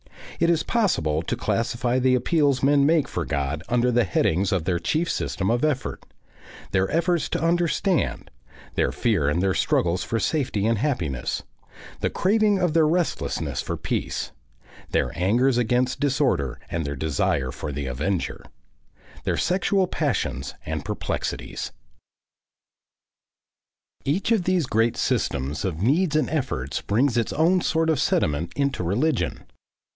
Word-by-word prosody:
It 170 - +3
is 165 -2 +2
possible 80 - +1
to - - -2
classify 120 +2 0
the 130 0 +3
appeals 140 -1 +2
men 140 0 +4
make 155 -1 +3
for 90 - -3
God 70 0 -2
under 125 +1 +2
the 120 0 +3
headings 90 +1 +1
of 95 -4 +1
their 85 0 0
chief 160 - 0
system 95 +3 -1
of 120 +3 0
effort, 150 -4 -1 0.7
their 95 0 +1
efforts 170 0 +1
to - - -1
understand, 175 +2 +1 0.4
their - - +1
fear 95 -12 +1
and 85 +5 0
their 95 -1 +2
struggles 85 0 +1
for 115 - -1
safety 125 -6 0
and 115 -1 +2
happiness, 85 - -1 0.6
the - - 0
craving 210 +1 +2
of 180 -4 +1
their 160 -2 +4
restlessness 175 +1 -1
for - - -4
peace, - - -3 0.6
their - - 0
angers 120 +8 +2
against 125 +2 +1
disorder 130 - +1
and 85 0 -1
their 70 -1 -3
desire 80 -1 0
for 75 - -5
the 70 0 -4
avenger; 75 +9 -2 0.8
their - - 0
sexual 190 +2 +2
passions 80 - -2
and 80 -1 -3
perplexities.... - - -4 2.3
Each 175 +11 0
of 210 -6 +2
these 185 -4 +2
great 115 -1 +1
systems 70 +4 -1
of 90 -3 -2
needs 155 - +2
and 155 - +2
efforts 130 - -2
brings 120 +5 +1
its 115 - 0
own 175 +4 +3
sort 160 0 +1
of 150 - 0
sediment 75 +3 +1
into 140 -4 0
religion. 105 - 0
120 Hz, 145 wpm, -24 LUFS, -, 2.3 s, men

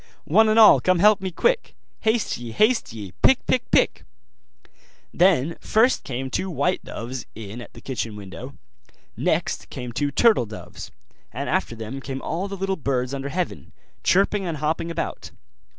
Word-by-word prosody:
One 215 +7 +4
and 215 - +3
all 220 -2 +8
come 185 -1 +3
help 205 +2 +5
me, 190 - -2
quick! 485 - 0 0.2
Haste 220 0 +1
ye, 120 -1 -7
haste 230 - +2
ye! 105 -4 -8
pick, 265 - +4
pick, 255 - 0
pick!' - - +2 1.1
Then 170 -4 +3
first 235 +4 +2
came 130 0 -4
two 190 - -2
white 170 +3 0
doves 120 +1 -6
in 110 +2 -8
at - - -12
the - - -12
kitchen 115 -5 -4
window; 95 -3 -9 0.6
next - - -1
came 125 -1 -6
two 145 +4 -1
turtle 175 - +3
doves; 110 - -9 0.4
and - - -4
after 115 - 0
them 115 +5 -6
came 135 0 -5
all 175 +5 -2
the 200 0 -6
little 190 0 -1
birds 130 -3 -1
under 140 0 -4
heaven, 175 +3 -4 0.3
chirping 195 +2 +2
and 170 -4 -3
hopping 160 +3 -1
about. 165 - -4
155 Hz, 165 wpm, -23 LUFS, 125-195 Hz, 1.1 s, all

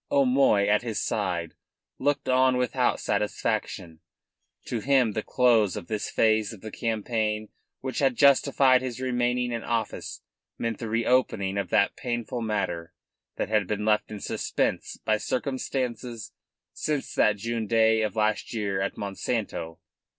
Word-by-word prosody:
O'Moy, 130 -7 +4
at 105 +1 +3
his 115 -3 -3
side, 90 -5 -2 0.5
looked 145 +1 0
on 130 0 +4
without 125 -2 +1
satisfaction. 105 -5 -2 0.7
To 120 - -2
him 130 -2 +3
the 110 - -2
close 115 -6 +3
of - - -6
this 105 +1 -3
phase 110 -1 +2
of 105 - -12
the 110 - -7
campaign 110 -1 -2 0.3
which 130 0 -3
had 135 -3 +2
justified 135 -1 +5
his 130 -2 -5
remaining 125 -1 0
in 115 -1 -2
office 115 -1 -3 0.3
meant 115 -2 -3
the 115 - -4
reopening 115 -4 +1
of 100 -3 -2
that 100 +1 +3
painful 120 0 -3
matter 95 -7 -2 0.4
that - - -2
had 105 -3 +2
been 105 +1 -2
left 105 -1 +2
in 105 - -6
suspense - - -2
by 110 0 +3
circumstances 125 -2 -3 0.4
since 150 -3 -2
that 105 -1 +3
June 115 +1 -3
day 110 0 +4
of 110 0 -1
last 110 +1 0
year 100 -3 -1
at 100 - -2
Monsanto. 100 -4 -3
110 Hz, 145 wpm, -26 LUFS, 105-125 Hz, 0.7 s, justified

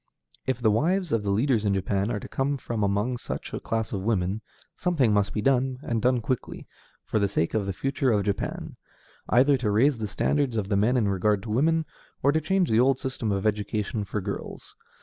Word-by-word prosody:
If 130 -2 0
the 110 -3 +3
wives 175 - +1
of 115 - +2
the 100 - -3
leaders 115 +2 +2
in 100 -2 +1
Japan 95 +2 0
are 110 -3 -1
to - - -9
come 140 +1 -1
from 120 -3 -4
among 105 +5 0
such - - -6
a - - -2
class 110 -1 -2
of 95 - -2
women, 100 -1 0 0.3
something 150 - +2
must 100 -1 +2
be 105 - -3
done, 130 -1 +2
and 115 -2 -1
done 125 0 +2
quickly, 125 +2 -4 0.4
for - - 0
the 100 - +2
sake 85 -3 -1
of 105 -3 0
the - - 0
future 135 +4 0
of 105 -2 +2
Japan; 100 -1 -3 0.5
either 135 +3 +5
to 125 -5 -1
raise 120 +5 +3
the 110 - -2
standards 130 +3 0
of 100 -2 -2
the 100 - +1
men 110 +6 +3
in 110 -4 +2
regard 100 +1 +1
to 110 - -5
women, 160 +7 +2 0.4
or 140 - +5
to 160 +2 +1
change 185 +1 +1
the 110 - +4
old 130 +1 +4
system 130 -5 -2
of 100 0 -1
education 105 0 -1
for 100 +1 -3
girls. 100 +1 -6
110 Hz, 220 wpm, -26 LUFS, 105-130 Hz, 0.5 s, either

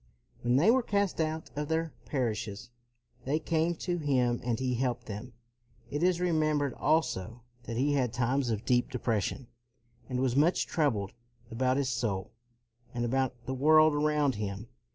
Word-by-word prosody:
When 120 +1 +2
they 165 - +5
were 260 +2 +4
cast 200 -6 0
out 160 0 -3
of 150 0 -2
their 160 0 -1
parishes, 115 -3 -3 0.5
they 140 +4 0
came 160 +1 0
to 175 +1 -2
him 125 -5 +1
and 120 -2 -1
he 130 -1 0
helped 120 -1 -1
them. 110 +4 -7 0.6
It 145 - -2
is 180 0 +3
remembered 155 -5 +1
also 120 - 0 0.2
that 115 - -4
he 145 +3 +2
had 130 -4 +1
times 125 +2 0
of 110 0 -2
deep 125 -1 +2
depression, 120 0 -2 0.6
and 125 -1 -2
was 130 -1 +1
much 155 +6 +3
troubled 115 - 0 0.4
about 130 +3 +1
his 140 -2 0
soul 115 -6 -2 0.6
and 120 0 0
about 125 -1 -1
the 130 - -3
world 155 +3 +5
around 150 -2 +2
him. 100 +3 -5
130 Hz, 160 wpm, -30 LUFS, 120-155 Hz, 0.6 s, they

